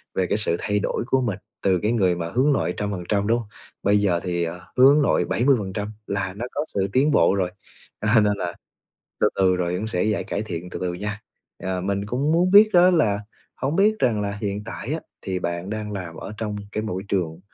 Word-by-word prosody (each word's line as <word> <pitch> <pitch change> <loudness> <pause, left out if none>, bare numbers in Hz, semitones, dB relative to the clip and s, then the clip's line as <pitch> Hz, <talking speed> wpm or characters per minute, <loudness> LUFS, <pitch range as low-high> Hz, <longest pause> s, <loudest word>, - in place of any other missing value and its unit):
về 95 -1 +1
cái - - +1
sự 95 -5 +1
thay 105 0 0
đổi - - -1
của 130 0 +2
mình 105 -5 -2 0.2
từ 95 -2 +3
cái 105 - +2
người 95 -7 +2
mà 85 -1 -4
hướng 140 +4 +3
nội - - 0
trăm 105 -1 -2
phần 90 -3 -4
trăm, 100 -1 +1
đúng 115 +1 +3
hông? 115 - -8 0.4
Bây 100 +1 +4
giờ 90 -4 +2
thì, 85 -1 -1
à, 85 +2 -4 0.2
hướng 140 +4 +7
nội - - +2
70%, 105 -5 0 0.2
là 100 -2 -2
nó 115 +5 -5
có 150 +2 -2
sự 95 -1 +1
tiến 140 +4 +3
bộ 100 - +4
rồi, 90 -2 0 0.5
à, 110 +2 +4
nên 105 0 +3
là 90 -2 -3 0.7
từ - - +4
từ 95 -1 +3
rồi 90 -1 -1
cũng 110 +3 -3
sẽ 90 -5 0
giải 105 -1 0
cải 100 - -3
thiện 90 -3 -6
từ - - -6
từ 90 -1 -2
nha. 105 +3 -5 0.4
À, 95 -1 -2
mình 100 +1 -1
cũng 135 +8 0
muốn 180 +3 +3
biết 210 +2 +8
đó 180 +1 +7
là 110 - +2 0.4
hổng 135 +4 -2
biết 210 +3 +4
rằng 110 -4 +2
là 100 0 -2
hiện 100 0 -2
tại 120 +4 -5
á, 160 - -2 0.2
thì 95 -1 -3
bạn 85 +2 -3
đang 110 -1 -4
làm 90 -4 -6
ở 105 - -7
trong 105 -2 -3 0.2
cái 110 - -2
mỗi 95 -3 -3
trường 85 -5 -1
105 Hz, 235 wpm, -23 LUFS, 95-120 Hz, 0.7 s, biết